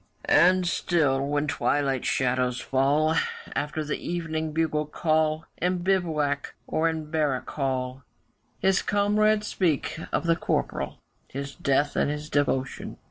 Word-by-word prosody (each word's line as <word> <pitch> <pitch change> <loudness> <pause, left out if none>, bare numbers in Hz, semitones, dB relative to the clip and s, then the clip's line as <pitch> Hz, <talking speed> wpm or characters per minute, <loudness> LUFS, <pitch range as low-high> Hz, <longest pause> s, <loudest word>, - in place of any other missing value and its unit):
And 180 +2 +5
still 145 -7 +1
when 145 +1 0
twilight 140 -3 0
shadows 125 -1 +1
fall, 145 +4 +2 0.4
After 145 +2 -2
the 150 - -4
evening 160 -2 -2
bugle 155 -1 0
call, 155 0 +1
In 180 0 0
bivouac 155 -7 0
or 165 +1 +1
in 160 -2 -5
barrack 150 -6 0
hall, 130 -2 -2 0.6
His 190 -1 +2
comrades 210 +1 +2
speak 165 -5 0
of - - 0
the 165 0 +4
Corporal, - - -2 0.3
His 140 +1 -6
death 140 +1 +1
and - - +2
his 150 +1 -5
devotion. 135 -2 -1
155 Hz, 130 wpm, -26 LUFS, 140-170 Hz, 0.6 s, And